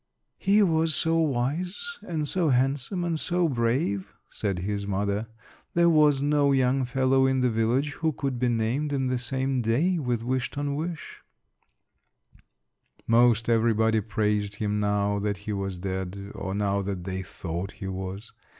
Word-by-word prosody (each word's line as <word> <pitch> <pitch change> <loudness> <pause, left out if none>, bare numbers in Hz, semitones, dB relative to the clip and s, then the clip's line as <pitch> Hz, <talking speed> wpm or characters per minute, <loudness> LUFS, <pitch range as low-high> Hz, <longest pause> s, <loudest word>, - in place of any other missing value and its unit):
"He 205 +2 +4
was 160 -3 +2
so 165 0 +2
wise 165 - -2
and 155 -4 -3
so 170 0 +1
handsome 135 +7 +1
and 165 -2 -1
so 175 +1 +1
brave," 120 - 0 0.2
said 100 -3 -2
his 100 +2 -3
mother; 100 +2 -1 0.5
"there 170 0 +5
was 150 -3 +4
no 145 -1 +3
young 130 0 +2
fellow 130 +1 +2
in 130 -1 +1
the 125 -1 +2
village 120 +6 +1
who 160 +2 -1
could 135 -3 -3
be 125 0 +2
named 120 +6 0
in 135 -2 0
the 125 -1 0
same 130 +1 -1
day 150 +11 +1
with 120 -5 -1
Wish 130 +1 -1
ton 145 0 -3
wish." 160 +2 -5 1.8
Most 115 0 +4
everybody 110 -1 +3
praised 105 -1 -1
him 105 0 -1
now 100 0 +1
that 100 0 -1
he 105 - -2
was 95 -2 -3
dead, 95 +2 -5
or 95 -1 -4
now 100 -1 0
that 95 -2 -4
they 95 0 -3
thought 90 +1 -5
he 95 - -7
was. 95 +3 -6
120 Hz, 160 wpm, -26 LUFS, 105-145 Hz, 1.8 s, there